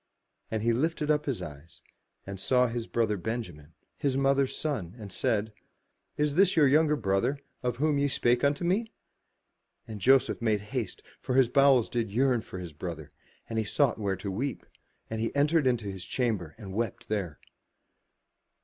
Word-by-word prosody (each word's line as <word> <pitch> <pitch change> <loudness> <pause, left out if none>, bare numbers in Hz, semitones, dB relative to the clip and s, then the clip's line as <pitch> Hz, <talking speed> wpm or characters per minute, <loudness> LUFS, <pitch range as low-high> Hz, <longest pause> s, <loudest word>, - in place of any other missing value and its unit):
And 110 -1 -2
he 115 0 +3
lifted 155 +4 0
up 150 0 0
his 135 -5 -2
eyes, 75 +2 -11 0.5
and 100 -1 -6
saw 125 +5 +3
his 115 -1 -3
brother 110 -3 0
Benjamin, 90 -7 -5 0.2
his 135 -2 0
mother's 135 0 +2
son, 110 - -3
and 105 -4 -9
said, 110 +2 0 0.3
'* - - -47
Is 150 -1 +1
this 190 +3 +4
your 150 -3 +6
younger 150 +2 +4
brother, 95 +3 0 0.2
of 125 -2 -1
whom 150 +1 +2
ye 140 - +2
spake 120 -2 +1
unto 140 +3 +2
me?" 215 +6 0 1.0
And 105 -3 -7
Joseph 135 +2 +4
made 110 -3 +1
haste 125 -5 -3 0.2
for 125 - -2
his 130 -3 +5
bowels 135 -3 +5
did 115 -3 -2
yearn 125 +2 +2
upon 95 -4 -8
his 85 -3 -8
brother: 80 -1 -7 0.4
and 115 -1 -2
he 110 - -1
sought 130 +1 +1
where 100 -2 0
to 100 0 -5
weep; 130 +7 -3 0.4
and 110 0 -4
he 115 - -2
entered 145 0 +3
into 120 -4 +1
his 95 -2 -7
chamber 105 - -2
and 100 -4 -8
wept 115 +3 -3
there. 95 -8 -2
120 Hz, 175 wpm, -29 LUFS, 105-140 Hz, 1.0 s, your